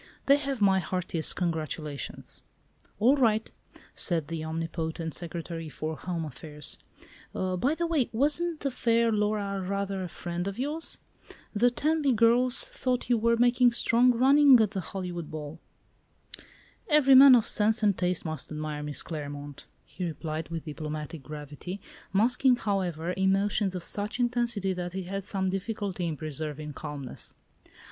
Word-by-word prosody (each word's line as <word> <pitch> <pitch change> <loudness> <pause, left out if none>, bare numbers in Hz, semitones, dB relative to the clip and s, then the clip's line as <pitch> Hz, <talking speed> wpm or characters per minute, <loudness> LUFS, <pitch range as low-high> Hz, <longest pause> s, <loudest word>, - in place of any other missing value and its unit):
"They 280 +1 +6
have 275 -4 -4
my 195 -1 +5
heartiest 175 -2 -2
congratulations." 155 -5 -4 0.5
"All 250 +7 +4
right," 225 -4 +2 0.4
said 165 -4 +2
the 165 -1 -4
omnipotent 160 0 -4
Secretary 165 -1 -5
for 155 +1 -4
Home 170 -1 -4
Affairs; 150 +1 -7 0.6
"by 185 - 0
the 340 - 0
way, 315 -7 +1
wasn't 300 +7 0
the 275 - -1
fair 230 -2 +2
Laura 205 -2 0
rather 195 0 -2
a 185 - -3
friend 175 +1 -5
of 200 - -4
yours? 295 +6 -2 0.6
The 230 +3 +4
Tenby 295 +2 +1
girls 245 - +4
thought 255 - -2
you 240 - +5
were 235 +1 +3
making 245 0 +4
strong 240 +1 +4
running 270 +2 +6
at 215 -3 +2
the 195 - -3
Hollywood 180 -3 -5
Ball." 155 +1 -7 1.3
"Every 295 -3 +5
man 265 0 +10
of 230 -2 +2
sense 220 +1 +2
and 205 -2 +4
taste 180 -1 -1
must 155 -1 -4
admire 150 -1 -4
Miss 150 -2 -3
Claremont," 145 -2 -7 0.2
he 185 - -7
replied 160 -1 -4
with 165 -1 -5
diplomatic 155 0 -6
gravity, 150 +6 -7 0.3
masking, 250 +5 +4
however, 180 -6 -2
emotions 195 +1 +1
of 180 - -4
such 205 +7 -4
intensity 240 -5 +1
that 180 -1 -5
he 190 0 -3
had 195 +2 -4
some 190 -2 -1
difficulty 195 -2 -3
in 155 -2 -3
preserving 150 0 -5
calmness. 145 -3 -7
190 Hz, 145 wpm, -28 LUFS, 160-240 Hz, 1.3 s, man